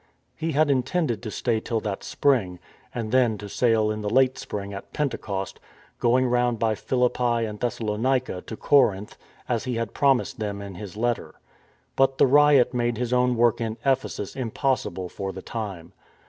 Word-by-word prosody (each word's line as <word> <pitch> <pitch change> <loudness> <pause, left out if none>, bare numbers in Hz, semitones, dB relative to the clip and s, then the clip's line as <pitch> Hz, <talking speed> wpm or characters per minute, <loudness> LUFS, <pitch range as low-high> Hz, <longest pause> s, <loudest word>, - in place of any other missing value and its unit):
He 160 0 -3
had 150 0 +3
intended 130 - 0
to 115 - -5
stay 115 +1 0
till 115 +1 -2
that 105 -3 -4
spring, 115 -11 +1 0.3
and 115 -3 -4
then 120 -4 +3
to 105 - -8
sail 110 0 +2
in 110 0 -4
the 105 - -2
late 130 +3 +3
spring 100 -4 -6
at 100 - -9
Pentecost,^ 105 -9 -3 0.4
going 125 +2 +3
round 120 -1 +1
by 110 0 +1
Philippi 120 0 0
and 105 -1 -6
Thessalonica 120 -2 -1
to 110 - -6
Corinth, 105 -8 +2 0.3
as 120 -3 -1
he 125 -2 -2
had 115 -1 -3
promised 135 -3 +2
them 105 -2 -3
in 100 -1 -7
his 100 +2 -9
letter. 120 +1 -1 0.6
But 135 0 +3
the - - +6
riot 140 -2 +5
made 120 -2 0
his 125 +1 -2
own 125 0 +3
work 120 0 +3
in 110 -1 -3
Ephesus 130 -7 -1
impossible 125 -6 -1
for 95 +2 -5
the 95 0 -9
time. 100 -8 -6
120 Hz, 175 wpm, -25 LUFS, 105-130 Hz, 0.6 s, the